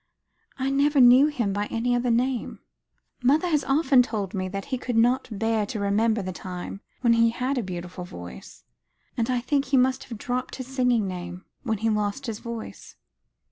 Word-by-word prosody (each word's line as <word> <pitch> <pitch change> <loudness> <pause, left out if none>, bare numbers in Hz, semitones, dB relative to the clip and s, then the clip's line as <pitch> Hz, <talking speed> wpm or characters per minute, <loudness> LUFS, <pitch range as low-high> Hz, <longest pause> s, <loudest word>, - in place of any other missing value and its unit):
I 270 0 -1
never 285 +1 +3
knew 255 +3 +8
him 240 -10 -1
by 205 +1 -1
any 240 +2 -1
other 245 0 0
name. 245 +1 0 0.6
Mother 285 +7 +3
has 300 -3 +2
often 275 -2 +4
told 215 -6 -3
me 185 -2 -2 0.2
he 260 - -2
could 245 -2 -2
not 245 +3 +3
bear 220 +1 0
to 215 - -4
remember 210 +2 +1
the 185 - -4
time 185 +2 -7 0.2
when 235 -2 +4
he 230 0 +4
had 255 +3 -1
a - - 0
beautiful 180 -2 -6
voice; 90 - -10 0.5
and 230 +1 -1
I 250 -1 +1
think 275 +3 0
he 265 +1 +2
must 260 +1 +2
have 230 - -8
dropped 250 +3 -3
his 260 - -6
singing 250 -5 +1
name, 180 0 -7 0.2
when 220 -4 -1
he 225 +2 0
lost 210 +5 -1
his 225 -3 -4
voice." 235 -1 -8
235 Hz, 185 wpm, -25 LUFS, 205-260 Hz, 0.6 s, knew